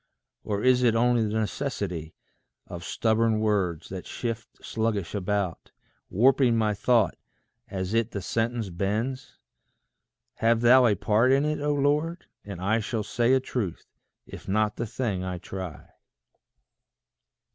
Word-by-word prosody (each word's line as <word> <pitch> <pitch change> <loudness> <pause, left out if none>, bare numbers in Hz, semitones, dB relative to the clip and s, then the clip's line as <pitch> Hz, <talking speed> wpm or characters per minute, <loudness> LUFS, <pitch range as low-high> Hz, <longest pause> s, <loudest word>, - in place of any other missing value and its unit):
Or 105 -1 -2
is 125 -1 +4
it 120 -2 +3
only 120 0 +3
the 110 0 0
necessity 100 - -3 0.5
Of 85 -1 -8
stubborn 110 +1 +1
words, 95 -7 0
that 95 -1 -7
shift 120 -1 -6
sluggish 110 -5 -2
about, 100 -2 -2 0.4
Warping 125 +2 +4
my 110 -1 +2
thought 110 -2 +2 0.5
as 95 +1 -3
it 115 0 +2
the 100 - -4
sentence 115 +2 -2
bends? 115 - -3 1.0
Have 115 0 +2
thou 125 +1 +7
a 105 - +3
part 110 +6 +2
in 135 +2 +3
it, 150 0 -1
O 150 0 +1
Lord, 150 +4 0 0.2
and 100 -4 -8
I 105 +5 +1
Shall 110 0 -2
say 120 +4 +1
a 130 - +5
truth, 120 -8 -4 0.4
if - - -11
not 105 +1 +1
the 120 - -2
thing 110 -5 -2
I 90 -1 -3
try. 95 -2 -7
110 Hz, 140 wpm, -26 LUFS, 100-120 Hz, 1.0 s, thou